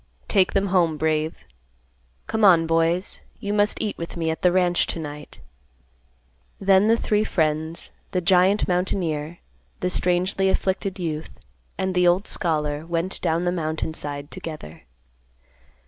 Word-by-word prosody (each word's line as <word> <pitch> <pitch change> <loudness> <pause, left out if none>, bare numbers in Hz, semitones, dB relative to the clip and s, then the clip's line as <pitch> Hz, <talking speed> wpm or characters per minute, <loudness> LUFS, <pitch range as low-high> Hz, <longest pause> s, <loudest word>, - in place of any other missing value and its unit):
"Take 190 -3 +2
them 195 0 +1
home, 170 -4 +3
Brave. 155 0 -1 0.8
Come 220 -1 -2
on, 175 -5 +6
boys, 165 +3 0 0.2
you 205 0 -3
must 205 0 +2
eat 210 - -3
with 170 +1 -6
me 165 -1 0
at 160 - -5
the 180 - +4
ranch, 175 -1 +2
to - - -4
night." 150 -1 -8 1.2
Then 195 +1 +4
the 230 +1 +4
three 210 -2 +1
friends, 160 -3 0 0.2
the 180 - 0
giant 185 +3 +3
mountaineer, 175 -3 -1 0.4
the 180 - -1
strangely 180 +2 +1
afflicted 190 0 -1
youth, 160 -4 -4 0.5
and 190 0 -1
the 180 -1 +3
old 180 +4 +3
scholar 150 -5 -1
went 170 +3 -3
down 165 +2 0
the 175 - +1
mountain 160 -2 -2
side 145 -1 -5
together. 80 - -8
175 Hz, 145 wpm, -23 LUFS, 160-190 Hz, 1.2 s, on